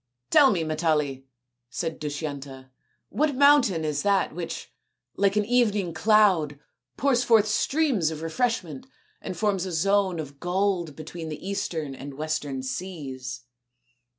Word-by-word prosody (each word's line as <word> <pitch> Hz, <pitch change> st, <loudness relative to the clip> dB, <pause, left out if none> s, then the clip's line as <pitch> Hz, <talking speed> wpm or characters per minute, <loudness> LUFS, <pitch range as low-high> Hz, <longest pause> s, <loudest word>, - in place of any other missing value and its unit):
"Tell 280 Hz, -2 st, +7 dB
me, 180 Hz, -8 st, 0 dB
Matali," 150 Hz, -4 st, -1 dB, 0.4 s
said 165 Hz, +4 st, -4 dB
Dushyanta, 140 Hz, -3 st, -6 dB, 0.4 s
"what 300 Hz, -1 st, 0 dB
mountain 260 Hz, -, +4 dB
is 150 Hz, -1 st, -1 dB
that 200 Hz, -5 st, +1 dB
which, 170 Hz, 0 st, -6 dB, 0.4 s
like 200 Hz, 0 st, +2 dB
an 210 Hz, -1 st, +2 dB
evening 210 Hz, -7 st, +1 dB
cloud, 185 Hz, -8 st, +3 dB, 0.4 s
pours 255 Hz, -1 st, +2 dB
forth 225 Hz, -3 st, +5 dB
streams 260 Hz, -, +1 dB
of 160 Hz, 0 st, -6 dB
refreshment 170 Hz, -, -2 dB, 0.3 s
and 185 Hz, -, -6 dB
forms 195 Hz, -2 st, 0 dB
a -, -, -5 dB
zone 190 Hz, +1 st, +1 dB
of 140 Hz, -2 st, -7 dB
gold 180 Hz, -3 st, -1 dB
between 160 Hz, +1 st, -7 dB
the 155 Hz, +4 st, -7 dB
eastern 160 Hz, -7 st, -3 dB
and 135 Hz, +1 st, -8 dB
the -, -, -13 dB
western 145 Hz, -3 st, -3 dB
seas 130 Hz, -4 st, -5 dB
170 Hz, 135 wpm, -26 LUFS, 150-205 Hz, 0.4 s, Tell